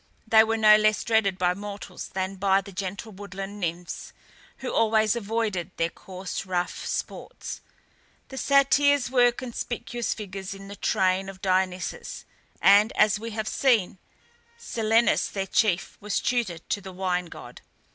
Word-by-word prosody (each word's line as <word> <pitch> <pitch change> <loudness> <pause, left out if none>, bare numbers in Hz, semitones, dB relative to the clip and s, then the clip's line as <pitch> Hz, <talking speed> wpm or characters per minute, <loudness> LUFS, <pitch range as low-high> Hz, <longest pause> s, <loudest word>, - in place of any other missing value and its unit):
They 220 -1 +6
were 225 0 0
no 215 -1 +7
less 215 0 +2
dreaded 220 -4 +2
by 180 -1 +2
mortals 205 +1 -7
than 190 0 -4
by 195 0 +3
the 200 - -11
gentle 195 +3 -5
woodland 200 0 -7
nymphs, 175 -1 -4 0.4
who 265 - -5
always 220 0 +3
avoided 215 -5 -2
their 165 0 0
coarse 185 0 -6
rough 180 -1 -2
sports. - - -5 0.7
The 265 - -8
Satyrs 280 -1 +3
were 245 -2 +5
conspicuous 240 -1 -4
figures 195 -2 -6
in 195 0 -11
the 200 - -7
train 190 -2 +1
of 190 -1 -10
Dionysus, 185 -1 -1 0.4
and, 205 +3 +6
as 210 0 +4
we 230 +1 -5
have 215 0 -2
seen, 225 -9 +2 0.6
Silenus 225 - +2
their 195 -1 -3
chief 195 -3 +1
was 210 0 -1
tutor 235 -9 0
to 200 +4 -4
the 190 -1 -9
wine 180 -1 -1
god. - - -11
200 Hz, 145 wpm, -26 LUFS, 190-225 Hz, 0.7 s, no